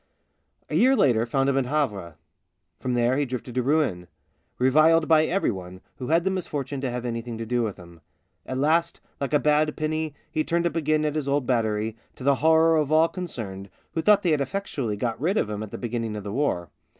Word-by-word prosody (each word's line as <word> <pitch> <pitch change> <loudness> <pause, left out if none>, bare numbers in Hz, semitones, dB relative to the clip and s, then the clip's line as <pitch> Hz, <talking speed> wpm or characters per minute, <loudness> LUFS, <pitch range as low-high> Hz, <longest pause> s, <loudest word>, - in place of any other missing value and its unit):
A - - -8
year 260 +3 +5
later 120 - +3
found 135 +3 +1
him 135 0 +2
at 130 - -1
Havre. 105 - -2 0.6
From 125 -1 -2
there 120 +2 +2
he 145 - +2
drifted 125 -1 -6
to 125 - +1
Rouen 125 - 0 0.3
— - - -46
reviled 155 +4 +4
by 155 -1 +5
every 190 -6 +1
one 90 -2 -8 0.2
who 125 - -6
had 165 +2 +3
the 190 - +1
misfortune 145 -7 -4
to 135 - -1
have 125 0 -4
anything 115 -1 -4
to 115 - -5
do 120 +2 0
with 110 -4 -3
him. 85 -2 -14 0.5
At 130 - -3
last, 160 +5 +1 0.2
like 140 - -2
a 150 - +5
bad 150 +1 +2
penny, 155 -1 -2 0.2
he 155 - 0
turned 170 +1 0
up 170 - -1
again 155 -1 +1
at 150 - 0
his 150 -3 -2
old 140 -1 +1
battery, 110 -3 0 0.2
to - - -10
the 140 +1 +4
horror 160 +1 +5
of 150 -1 0
all 160 +1 +5
concerned, 105 - -6 0.2
who 165 - -1
thought 205 +2 +4
they 175 - +2
had 150 -2 +2
effectually 135 - -3
got 115 +2 -3
rid 185 +7 +1
of 105 - 0
him 105 0 -4
at 110 - -6
the - - -7
be 120 - -4
ginning 115 -2 -3
of 105 - -6
the 100 0 -5
war. 100 - -1
135 Hz, 230 wpm, -25 LUFS, 115-155 Hz, 0.6 s, year